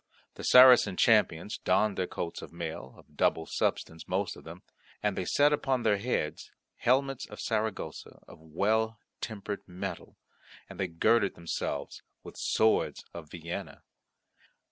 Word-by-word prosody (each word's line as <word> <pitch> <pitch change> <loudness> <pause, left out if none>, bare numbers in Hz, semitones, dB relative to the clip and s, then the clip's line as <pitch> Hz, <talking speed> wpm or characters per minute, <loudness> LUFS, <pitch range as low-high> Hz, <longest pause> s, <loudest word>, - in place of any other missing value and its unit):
The - - -10
Saracen 125 -7 +7
champions 105 -4 +2
donned 105 -2 +2
their 90 - -1
coats 85 - -5
of - - -10
mail, 80 -6 -6
of - - -20
double 80 - +1
substance 80 0 -2
most 95 0 -1
of - - -14
them, 85 +3 -11 0.4
and 105 -2 +1
they 90 - -3
set 145 +9 +3
upon 135 -4 0
their 105 -2 +3
heads 100 -9 -2 0.3
helmets 135 +1 +1
of - - -11
Saragossa 110 -2 -3
of - - -14
well 105 +8 0 0.2
tempered 105 -2 -5
metal, 90 0 -7 0.5
and 95 -1 -12
they 95 - 0
girded 100 +5 +2
themselves 85 -1 -4 0.2
with - - -11
swords 110 0 +1
of 80 -3 -9
Vienna. 85 +1 -7
100 Hz, 145 wpm, -29 LUFS, 85-110 Hz, 0.5 s, Saracen